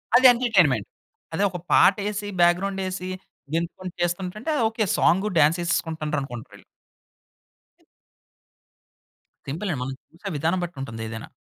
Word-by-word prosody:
అది 255 - +6
ఎంటర్టైన్మెంట్. 185 - +2 0.5
అదే 195 - +1
ఒక 180 - -5 0.2
పాటేసి, 205 +1 +3
బ్యాక్‌గ్రౌండే‌సి 185 +1 +1 0.4
గెంతుకుంటూ 170 +2 -3
చేసుకుంటుంటే. 185 - -3
అది 245 - +1
ఓకే. 225 -1 -1
సాంగు 195 +4 +3
డాన్సేసుకుంటున్నారు 160 -1 +1
అనుకుంటారు 120 -4 -8
వీళ్ళు. - - -16 2.8
సింపుల్ 170 +8 -3
అండి. 125 - -4
మనం 135 +1 -4 0.2
చూసే 180 +5 -7
విధానం 165 +5 +1
బట్టి 175 -5 -6
ఉంటుంది 115 -4 -6
ఏదైనా. 110 0 -7
175 Hz, 115 wpm, -24 LUFS, 150-200 Hz, 2.8 s, అది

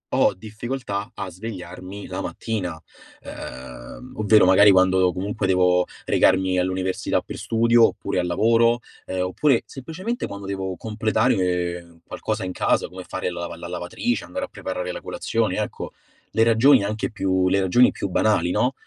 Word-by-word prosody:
ho - - +3
difficoltà 105 +1 -5
a - - -4
svegliarmi 95 0 -8
la 95 +1 -5
mattina. 95 -9 -4 0.4
Ehm, 65 -2 -9
ovvero 105 -1 +5
magari 95 +3 +7
quando 95 -1 +4
comunque 95 +1 -2
devo 90 -1 +3 0.2
recarmi 95 -1 +3
all'università 95 +1 -1
per - - -8
studio 115 0 +4
oppure - - -3
al 90 - -1
lavoro, 115 +6 +3 0.3
ehm, 95 0 -3
oppure 115 +8 +2
semplicemente 185 - -5
quando 100 0 -8
devo 95 -1 -3
completare 90 -6 0
qualcosa - - -3
in 90 - -3
casa - - +1
come 90 +1 -9
fare 95 -1 -3
la 85 - -6
lava 85 -1 -6
la 85 - -7
lavatrice, 90 - -2
andare 275 0 -4
a - - -17
preparare 90 -1 -4
la - - -7
colazione, - - -1
ecco, - - -4 0.4
le 115 - +3
ragioni 115 +2 +5
anche 105 +2 -2
più 95 -3 +1
le 100 +1 +2
ragioni 120 +7 +5
più - - -4
banali, 90 -2 +2
no, 125 +7 +1
95 Hz, 155 wpm, -23 LUFS, 90-110 Hz, 0.4 s, magari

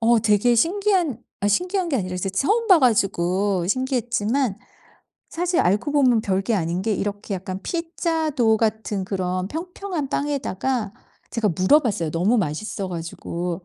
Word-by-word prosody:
어 230 0 +4
되게 215 +2 +3
신기한 350 - +1 0.2
아 205 - +1
신기한 360 - 0
게 285 - +1
아니라 185 -5 -3
이제 180 +2 -2
처음 415 - +1
봐 375 -3 +8
가지고 195 - +1
신기했지만 245 -2 0 0.7
사실 350 +1 0
알고 205 - +1
보면 255 -6 +4
별 195 -2 0
게 225 +3 0
아닌 175 0 -1
게 220 - 0
이렇게 205 +1 -3
약간 185 0 -5
피자 330 -1 -2
도우 230 -6 +3
같은 220 -3 -1
그런 185 -1 -2
평평한 345 - -4
빵에다가 265 -6 -2 0.4
제가 230 -3 0
물어봤어요, 185 - +2
너무 185 +9 +2
맛있어 190 +3 -3
가지고. 170 +1 -5
220 Hz, 320 characters per minute, -23 LUFS, 190-290 Hz, 0.7 s, 봐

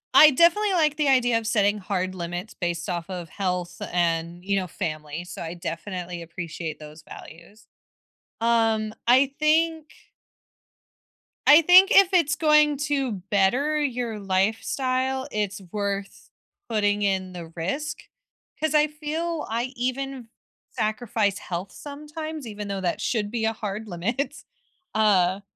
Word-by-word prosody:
I 305 - +10
definitely 345 +8 +4
like 310 -4 +2
the 300 -2 +1
idea 245 -3 +3
of 225 - -6
setting 210 -2 +2
hard 185 -1 -2
limits 175 +3 -5
based 170 -2 -3
off 175 -1 -4
of 175 -3 -6
health 180 -2 -3
and, 170 0 -1
you 200 0 +1
know, 185 -1 -1
family, 155 -1 -5
so 180 - -8
I 165 +1 -5
definitely 175 +1 -5
appreciate 165 -1 -6
those 155 +1 -12
values. 200 +7 -13 0.8
Um, 225 -2 +2
I 260 +3 +5
think 320 +1 +2 1.6
I 300 +3 +9
think 365 +5 +7
if 390 -5 +6
it's 315 -4 +3
going 300 -2 +4
to 275 -4 0 0.2
better 250 +10 +2
your 245 -6 -2
lifestyle, 255 +7 0
it's 205 -2 -2
worth 200 -1 -4 0.4
putting 205 -2 +1
in 190 -2 0
the 170 -2 -8
risk, 275 - -3 0.6
'cause 315 0 0
I 300 0 +5
feel 310 +2 -3
I 230 +2 -1
even 255 0 -3 0.4
sacrifice 215 -3 -1
health 180 +2 -5
sometimes, 300 0 -7
even 210 -1 -6
though 195 -1 -3
that 175 -2 -1
should 210 -4 -1
be 225 0 -3
a 225 - +1
hard 215 0 -5
limit. 210 +10 -3 0.5
Uh, 195 -3 +3
215 Hz, 135 wpm, -25 LUFS, 185-280 Hz, 1.6 s, I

